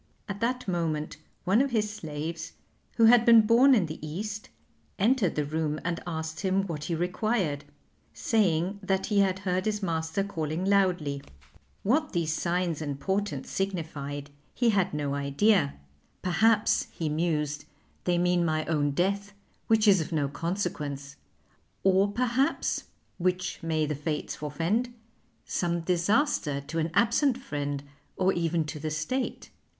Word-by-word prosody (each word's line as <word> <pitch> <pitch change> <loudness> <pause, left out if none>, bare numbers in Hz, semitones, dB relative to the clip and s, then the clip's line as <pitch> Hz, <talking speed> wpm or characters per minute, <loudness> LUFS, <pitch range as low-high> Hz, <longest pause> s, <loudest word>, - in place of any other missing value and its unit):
At 200 0 -5
that 250 +1 -1
moment 160 -4 -1 0.3
one 195 +6 +4
of 275 - +1
his 220 -4 +1
slaves, 160 -1 -5 0.4
who 230 - +6
had 235 +1 +7
been 230 -2 +8
born 250 +5 +6
in 205 -7 +3
the 155 0 -7
East, 205 +7 -5 0.5
entered 215 -2 +2
the 150 - 0
room 155 0 -1
and 170 -1 -1
asked 160 -1 -4
him 195 0 +1
what 155 -5 -5
he 170 - -1
required, 180 -4 -1 0.5
saying 195 -3 +1
that 190 -1 0
he 210 -2 +2
had 190 -2 +3
heard 185 0 0
his 210 -1 -1
master 160 +2 -1
calling 165 -2 -3
loudly. 180 -8 +2 0.6
What 295 +8 +1
these 165 -3 0
signs 170 -2 -1
and 145 -2 -4
portents 190 -4 -2
signified 145 -7 -3 0.2
he 240 -2 +3
had 195 -4 +1
no 145 -2 -2
idea; 140 - +2 0.5
perhaps, 210 +4 +3
he 165 - -3
mused, 150 -2 -1 0.4
they 175 -1 +2
mean 175 0 +2
my 155 -1 0
own 145 -3 +1
death, 200 +5 0 0.3
which 220 -1 +4
is 195 -4 +6
of 160 - -5
no 150 -3 +1
consequence; 145 -3 -3 0.7
or 195 +1 +4
perhaps 250 +4 0 0.3
which 185 +1 -1
may 160 -2 0
the 150 - -2
Fates 150 +1 -3
forfend 180 +11 -1 0.5
some 170 -1 -1
disaster 180 - +1
to 165 +4 -4
an 160 +1 0
absent 255 +3 +3
friend 145 - -4 0.3
or 190 0 +3
even 165 -1 0
to 150 0 -6
the 155 +1 -3
State. 155 +13 -3
175 Hz, 145 wpm, -28 LUFS, 155-205 Hz, 0.7 s, been